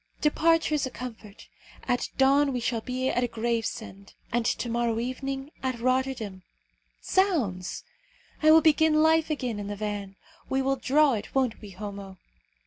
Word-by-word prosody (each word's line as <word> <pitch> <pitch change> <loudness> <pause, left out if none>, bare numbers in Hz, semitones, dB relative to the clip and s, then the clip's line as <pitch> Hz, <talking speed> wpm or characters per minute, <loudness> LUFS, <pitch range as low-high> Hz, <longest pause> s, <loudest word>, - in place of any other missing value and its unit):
Departure 325 +1 +2
is 290 -3 +1
a - - -5
comfort. 225 -5 -9 0.4
At 245 -1 0
dawn 275 +1 +4
we 250 - -1
shall 230 -1 -1
be 255 +2 -2
at 245 -1 0
Gravesend, 225 -3 -3 0.2
and 235 0 +1
to - - -1
morrow 235 -1 0
evening 270 +3 -4
at 255 -2 -2
Rotterdam. 255 -6 -1 0.6
Zounds! 260 - 0 0.6
I 310 - +5
will 320 +1 +8
begin 315 0 +4
life 320 0 +3
again 250 -8 -2
in 205 - -5
the 205 - -4
van. 205 -1 -4 0.3
We 265 0 +1
will 270 +1 +1
draw 280 +2 +3
it, 210 +2 -5
won't 255 -4 +1
we, 210 - -9
Homo?" 195 0 -8
250 Hz, 155 wpm, -27 LUFS, 220-275 Hz, 0.6 s, will